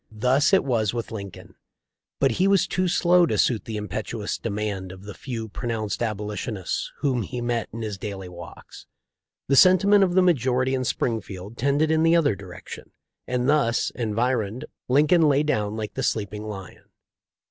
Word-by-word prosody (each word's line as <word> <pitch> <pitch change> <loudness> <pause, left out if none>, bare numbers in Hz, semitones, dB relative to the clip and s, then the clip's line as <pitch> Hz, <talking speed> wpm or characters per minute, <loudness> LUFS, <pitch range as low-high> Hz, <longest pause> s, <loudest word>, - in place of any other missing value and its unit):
" - - -46 0.2
Thus 140 +7 +4
it 195 - +4
was 115 -4 0
with 115 - -4
Lin 100 -3 -5
coln. - - -14 0.7
But 135 - +3
he 190 - +4
was 195 -2 +4
too 185 0 -1
slow 175 0 +4
to - - -1
suit 115 -4 +1
the 110 -2 -4
impetuous 105 -3 -4
demand 100 -2 -3
of 95 +1 -12
the 105 0 -8
few 115 -4 -6
pronounced 110 -2 -3
Abolitionists 105 -2 -3
whom 130 -4 +1
he 125 +3 -5
met 120 -2 -2
in 115 +1 -6
his 105 -3 -5
daily 100 -3 -6
walks. 85 -1 -12 0.6
The 140 - +3
sentiment 195 +5 +6
of 180 -2 +1
the 185 - +5
majority 130 -6 +2
in 130 -1 -1
Springfield 110 -4 -3
tended 140 +5 +1
in 160 0 +3
the 165 +1 +4
other 145 -10 +3
direc 95 -2 -11
tion, - - -9 0.4
and 125 0 -1
thus 140 -6 +2
environed, 115 -1 -1 0.2
Lincoln 150 +6 +4
lay 145 +1 +3
down 105 -8 -1
like 110 -1 -5
the 135 - -3
sleeping 105 -3 -2
lion. 95 -3 -9
120 Hz, 180 wpm, -24 LUFS, 105-145 Hz, 0.7 s, sentiment